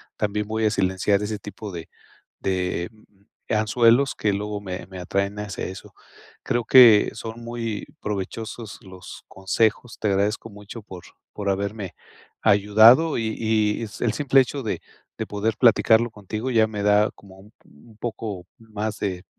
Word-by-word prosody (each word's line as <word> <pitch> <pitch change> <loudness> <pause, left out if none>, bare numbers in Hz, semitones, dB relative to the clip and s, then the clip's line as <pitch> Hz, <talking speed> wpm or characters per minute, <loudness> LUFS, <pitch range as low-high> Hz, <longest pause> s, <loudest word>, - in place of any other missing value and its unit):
también 105 0 -2
voy 110 +1 -1
a - - +4
silenciar 95 0 +1
ese 105 0 -3
tipo 105 +1 -8
de 85 -2 -8 0.5
de, 90 -1 -2
mm, 105 -2 -26 0.3
anzuelos 115 +5 +3
que 105 - 0
luego 105 +1 -3
me 95 -2 -6
me 95 -1 -9
atraen 100 +3 -2
hacia 105 -2 -5
eso. 95 +1 -9 0.5
Creo 120 0 0
que 120 -5 +7
son 115 +1 -8
muy 115 -3 -4
provechosos 105 +2 -5
los 95 -2 -11
consejos, 110 +5 -1
te - - -1
agradezco 100 +3 0
mucho 105 +2 -11
por 95 -4 -11 0.3
por 100 -1 -3
haberme 100 0 -3 0.5
ayudado 110 +9 +5
y 110 -2 -2
y 110 -1 +1 0.2
el 120 - +1
simple 140 -2 +4
hecho 135 +1 -4
de 110 - -2 0.4
de - - -3
poder 105 +1 -1
platicarlo 115 -1 +4
contigo 110 +4 -5
ya 110 -2 +4
me 105 -2 -5
da 105 +1 +4
como 95 -1 -16
un 105 +3 -17
un 105 +9 -20
poco 110 -5 -5
más 110 -1 -5
de, 95 -3 -3
105 Hz, 155 wpm, -23 LUFS, 100-115 Hz, 0.5 s, que